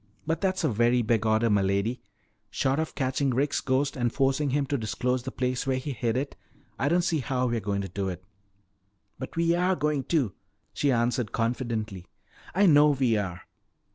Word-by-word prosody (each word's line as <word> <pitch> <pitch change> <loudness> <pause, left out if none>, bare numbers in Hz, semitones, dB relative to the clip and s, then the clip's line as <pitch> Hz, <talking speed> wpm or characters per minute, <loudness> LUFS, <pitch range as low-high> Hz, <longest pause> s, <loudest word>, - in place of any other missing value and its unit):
"But 165 +1 -1
that's 185 -2 0
a 155 - +3
very 120 +2 +2
big 110 -1 +1
order, 110 +2 +3
m'lady. 100 +3 +1 0.5
Short 135 +6 0
of 160 - -3
catching 135 0 0
Rick's 135 +4 0
ghost 135 +1 0
and 120 -2 0
forcing 135 +1 +1
him 140 +1 +1
to 140 +1 -1
disclose 125 +3 -1
the 130 +2 -6
place 125 0 -2
where 130 -1 +1
he 135 +3 -4
hid 120 -2 -1
it, 140 +2 -3 0.4
I 140 - +1
don't 175 +2 +2
see 165 -3 +1
how 130 -1 -1
we're 120 -2 0
going 100 -1 -2
to 95 - -4
do 95 +1 -3
it." 90 0 -7 1.0
"But - - -7
we 170 0 +2
are 180 +2 +2
going 150 -3 -1
to," 140 - +1 0.4
she 145 - +1
answered 120 -1 0
confidently. 115 -5 -2 0.5
"I 200 +2 +5
know 150 -3 +6
we 130 -5 +2
are!" 95 -3 -3
130 Hz, 190 wpm, -27 LUFS, 115-145 Hz, 1.0 s, know